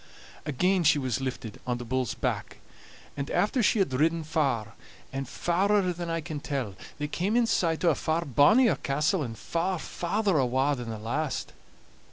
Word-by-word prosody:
Again 180 +6 +2
she 150 - +5
was 130 -3 -1
lifted 125 -5 -5
on 125 -1 0
the 120 - -7
bull's 130 0 -1
back, - - -3 0.6
and 140 0 -4
after 210 +8 +1
she 225 - +3
had 190 -10 +1
ridden 160 +5 +2
far, 135 -9 0 0.4
and 135 -1 -4
farer 185 +3 +1
than 170 0 -5
I 165 0 -1
can 155 -2 -5
tell, 135 -8 -3 0.2
they 150 - -2
came 185 +8 -1
in 240 -1 +4
sight 170 -6 +1
o' 170 - +6
a - - +2
far 160 +3 -1
bonnier 210 - +5
castle, 150 +6 0
and 115 -5 -4
far 180 +2 -1
farther 185 +1 0
awa' 130 +3 +2
than 120 -3 -6
the 110 - -4
last. 130 +7 -3
150 Hz, 180 wpm, -28 LUFS, 130-175 Hz, 0.6 s, o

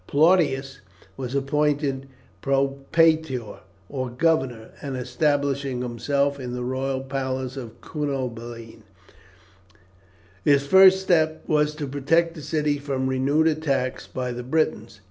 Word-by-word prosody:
Plautius 140 -4 +2 0.4
was 130 +3 -5
appointed 140 -1 0 0.3
propraetor, 140 -1 +1 0.3
or 130 +1 -4
governor, 125 -4 0
and 135 -2 -4
establishing 140 0 0
himself 140 +4 -1
in 125 -2 -5
the 125 0 -3
royal 130 +1 -2
palace 130 -1 -3
of 120 -5 -8
Cunobeline, 120 -6 -5 1.6
his 140 -1 +4
first 190 +4 +7
step 160 -4 +1
was 150 0 +1
to 150 -1 -4
protect 150 +5 +1
the 160 - -9
city 150 -1 0
from 135 -2 -2
renewed 135 +4 +2
attacks 140 -5 0
by 125 -1 -4
the 120 0 -5
Britons. 125 -5 -1
135 Hz, 115 wpm, -24 LUFS, 130-150 Hz, 1.6 s, first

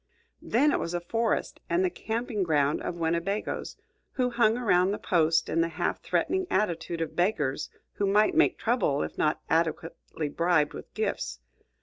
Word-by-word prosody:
Then 280 +7 +2
it - - +1
was 170 +1 -3
a - - 0
forest, 225 +6 -1
and 360 +2 +2
the 365 - 0
camping 225 - -3
ground 150 -4 +1
of 175 - -4
Winnebagoes, 170 +5 -2 0.4
who 250 -2 0
hung 235 -1 +3
around 185 -6 +3
the 205 - -1
post 165 -3 +2
in 165 - +1
the 165 - +2
half 165 - -2
threatening 375 -1 0
attitude 170 -4 -1
of 165 - -3
beggars 155 -7 0 0.2
who 200 - -1
might 210 +2 +3
make - - +3
trouble 220 - +1
if - - -6
not 150 - +1
adequately 165 -1 -1
bribed 165 -1 +1
with - - -9
gifts. 65 -1 -2
175 Hz, 165 wpm, -28 LUFS, 160-220 Hz, 0.4 s, hung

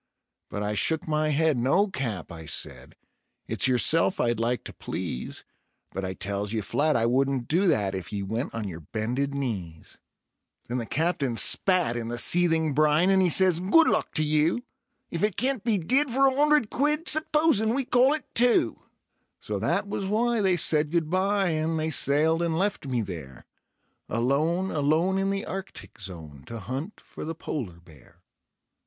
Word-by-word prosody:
But 105 - -4
I 105 0 -1
shook 160 +12 0
my 155 0 +1
head: 155 -2 +2
"No, 140 - +3
Cap," 120 - -4
I 80 -1 -9
said; - - -6 0.5
"it's - - 0
yourself 155 +8 +1
I'd 120 -2 +1
like 120 +2 -1
to - - -9
please, 60 - -6 0.5
But 95 - -5
I 95 0 -4
tells 100 +3 -4
ye 110 - -1
flat 150 +9 0
I 115 - +2
wouldn't 130 0 +1
do 180 +5 +2
that 100 - +1
if 95 -2 -6
ye 100 -2 -3
went 110 +7 -3
on 110 -3 -3
yer 85 -4 -7
bended 120 - -3
knees." 95 - -5 0.7
Then 125 +1 -2
the 115 - -5
Captain 150 -7 -1
spat 180 - +3
in 115 -1 -4
the 120 +1 -4
seething 165 0 +3
brine, 155 +5 +3
and 190 -1 +4
he 180 - +3
says: 180 0 +3
"Good 200 - +4
luck 215 - +1
to 155 - +2
you, 155 +9 +1 0.5
If - - -3
it 210 -3 0
can't 255 -1 +1
be 225 -3 +1
did 260 - +1
for 270 +3 +3
a 265 - +4
'undred 295 -4 +3
quid, 300 +4 0
supposin' 300 -7 +2
we 270 -1 -1
call 255 +4 +4
it 310 - -8
two?" 235 - +2 0.6
So 105 -2 -4
that 170 - 0
was 200 -1 -3
why 230 +2 +1
they 190 -3 +2
said 150 -2 +1
good 165 -1 -1
by, 195 +1 +1
and 160 0 -1
they 160 0 -1
sailed 155 +3 +2
and 165 -1 0
left 195 -5 -1
me 125 -3 0
there 80 - -8 0.6
Alone, 155 - 0
alone 160 +6 +1
in 195 0 0
the 195 0 -2
Arctic 195 - -8
Zone 80 -8 -9
to 115 - -6
hunt 135 - -6
for - - -10
the 165 +1 -5
polar 110 - -5
bear. 80 -6 -19
155 Hz, 180 wpm, -26 LUFS, 115-195 Hz, 0.7 s, and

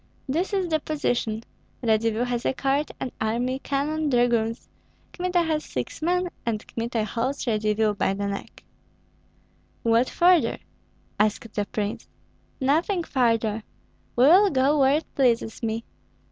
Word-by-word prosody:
This 330 +9 -1
is 385 -3 0
the 315 -1 +2
position! 245 -8 -1 0.4
Radzivill 225 +1 +2
has 245 -1 -2
a - - 0
court, 275 +3 0
an 255 - -3
army, 245 +4 0
cannon, 295 +3 -1
dragoons; 240 -3 +1 0.5
Kmita 360 -1 +1
has 310 -2 -1
six - - -5
men, 360 +2 +1
and 225 -2 -2
Kmita 230 -1 -2
holds 250 +7 -2
Radzivill 215 -2 +1
by 195 -1 0
the 200 +1 -3
neck." 200 0 -6 1.2
"What 230 +2 +3
further?" 350 -1 +4 0.6
asked 215 +1 0
the 205 - -1
prince. 210 -1 -3 0.5
"Nothing 325 +7 +1
further! 230 -6 +1 0.5
We 245 - +4
will 370 +9 +7
go 280 +1 +2
where 275 +2 +5
it 320 - -8
pleases 235 -4 +1
me. 225 0 -2
245 Hz, 135 wpm, -25 LUFS, 225-305 Hz, 1.2 s, will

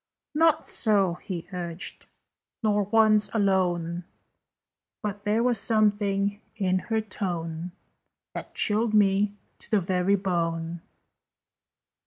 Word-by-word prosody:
"Not 320 +1 +3
so," 200 -5 +4
he 175 -4 -6
urged, 175 -1 -5 0.6
"nor 210 -2 +2
once 215 0 +4
alone: 180 -4 +1 1.0
But 205 -1 -4
there 215 +3 +2
was 245 -1 +2
something 205 -2 +1
in 185 -3 +1
her 220 +2 -1
tone 175 -4 -4 0.6
That - - -8
chilled 215 +1 +2
me 205 0 +3 0.2
to - - -12
the 215 - +3
very 185 +2 +1
bone. 170 -3 -2
200 Hz, 105 wpm, -26 LUFS, 180-215 Hz, 1.0 s, so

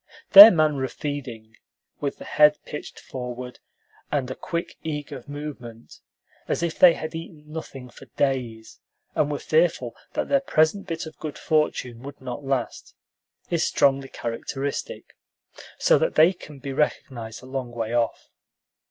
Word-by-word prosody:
Their 205 +2 +13
manner 155 -7 +1
of 130 - -4
feeding, 125 -7 -6 0.4
with 140 -1 -3
the - - -10
head 150 0 +5
pitched 150 - -8
forward, 125 -1 -7 0.5
and 135 -3 -1
a - - -4
quick, 170 0 -5
eager 150 -4 -5
movement, 140 -6 -9 0.5
as - - -1
if 170 -2 -2
they 175 -2 +8
had 155 - -6
eaten 160 -2 -8
nothing 150 -4 -8
for 135 +2 -15
days, 120 -5 -2 0.3
and 150 -1 +1
were 145 - -1
fearful 155 -8 +1 0.2
that - - -2
their 280 - +3
present 195 - +1
bit 165 -2 -4
of 160 - -11
good 150 -2 -6
fortune 130 -6 -1
would 140 +1 -10
not 130 +2 -7
last, 135 -3 -3 0.6
is 170 -2 +1
strongly 135 -1 +2
characteristic, 135 +4 -5 0.6
so - - +4
that - - 0
they 165 +4 +6
can 150 -5 -13
be 135 0 -6
recognized 120 -5 -3
a - - -11
long 130 -1 -4
way 115 -1 -4
off. 120 -1 -1
140 Hz, 150 wpm, -24 LUFS, 125-155 Hz, 0.6 s, Their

